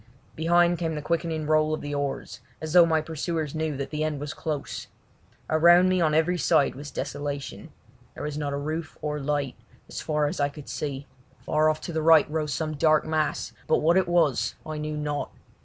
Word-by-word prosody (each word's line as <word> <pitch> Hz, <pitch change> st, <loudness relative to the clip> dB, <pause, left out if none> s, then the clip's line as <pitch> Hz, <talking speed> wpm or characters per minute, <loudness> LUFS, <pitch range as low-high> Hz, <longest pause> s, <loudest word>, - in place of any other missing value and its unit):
Behind 175 Hz, +1 st, +3 dB
came 165 Hz, -2 st, -1 dB
the 150 Hz, -, -3 dB
quickening 165 Hz, -1 st, -1 dB
roll 155 Hz, 0 st, +2 dB
of -, -, -8 dB
the 145 Hz, 0 st, -5 dB
oars, 145 Hz, -1 st, -3 dB, 0.2 s
as 155 Hz, +1 st, -5 dB
though 175 Hz, -2 st, +8 dB
my 160 Hz, -1 st, +2 dB
pursuers 160 Hz, -1 st, -3 dB
knew 155 Hz, -3 st, -2 dB
that 140 Hz, -, -4 dB
the 155 Hz, 0 st, -1 dB
end 155 Hz, -2 st, -2 dB
was 145 Hz, +1 st, -5 dB
close. 150 Hz, -3 st, -4 dB, 0.6 s
Around 175 Hz, +3 st, +6 dB
me 185 Hz, -1 st, +2 dB
on 155 Hz, -2 st, +2 dB
every 175 Hz, +3 st, +2 dB
side 140 Hz, +1 st, +3 dB
was 145 Hz, +2 st, -8 dB
desolation; 145 Hz, 0 st, -5 dB, 0.4 s
there -, -, -7 dB
was 150 Hz, -1 st, -3 dB
not 145 Hz, -1 st, -2 dB
a 140 Hz, -, -2 dB
roof 155 Hz, +2 st, -4 dB
or 150 Hz, 0 st, -2 dB
light, 145 Hz, -2 st, -1 dB, 0.3 s
as -, -, -6 dB
far 150 Hz, -1 st, 0 dB
as 145 Hz, -, -2 dB
I 145 Hz, 0 st, +2 dB
could 145 Hz, 0 st, -11 dB
see. 140 Hz, -2 st, -4 dB, 0.4 s
Far 155 Hz, 0 st, +3 dB
off 155 Hz, 0 st, -1 dB
to 170 Hz, -, -6 dB
the 160 Hz, -, 0 dB
right 160 Hz, -1 st, +6 dB
rose 155 Hz, -1 st, -1 dB
some 155 Hz, +3 st, -2 dB
dark 155 Hz, +1 st, +3 dB
mass, 155 Hz, -1 st, -1 dB
but -, -, +4 dB
what 165 Hz, +3 st, +3 dB
it 190 Hz, -1 st, +3 dB
was 165 Hz, -7 st, +2 dB
I 155 Hz, -1 st, -5 dB
knew 150 Hz, 0 st, -3 dB
not. 145 Hz, -1 st, -2 dB
155 Hz, 205 wpm, -26 LUFS, 145-160 Hz, 0.6 s, though